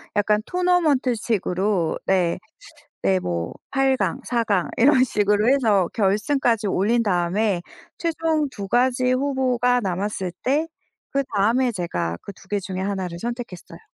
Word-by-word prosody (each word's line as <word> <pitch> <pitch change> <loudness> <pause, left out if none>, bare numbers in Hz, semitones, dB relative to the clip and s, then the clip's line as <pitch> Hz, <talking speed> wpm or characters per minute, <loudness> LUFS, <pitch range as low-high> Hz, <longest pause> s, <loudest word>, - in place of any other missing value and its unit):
약간 210 +1 +2
토너먼트식으로 240 - +1
네 180 -3 +2 0.7
네 190 -1 +3
뭐 85 - -3 0.2
8 270 0 +2
강, 265 - -1
4 235 -2 0
강 200 -6 0
이런식으로 220 -5 +3
해서 215 -10 +3
결승까지 225 +2 +1
올린 215 +5 +2
다음에 185 0 +1 0.4
최종 320 -3 0
두가지 250 +4 +1
후보가 255 -2 +1
남았을 190 -1 -2
때 295 +5 +1 0.4
그다음에 250 -1 +1
제가 90 - -3
그 200 - -9
두개 200 +2 -4
중에 185 -1 -5
하나를 190 -3 -3
선택했어요. 235 -5 -6
215 Hz, 265 characters per minute, -23 LUFS, 190-255 Hz, 0.7 s, 네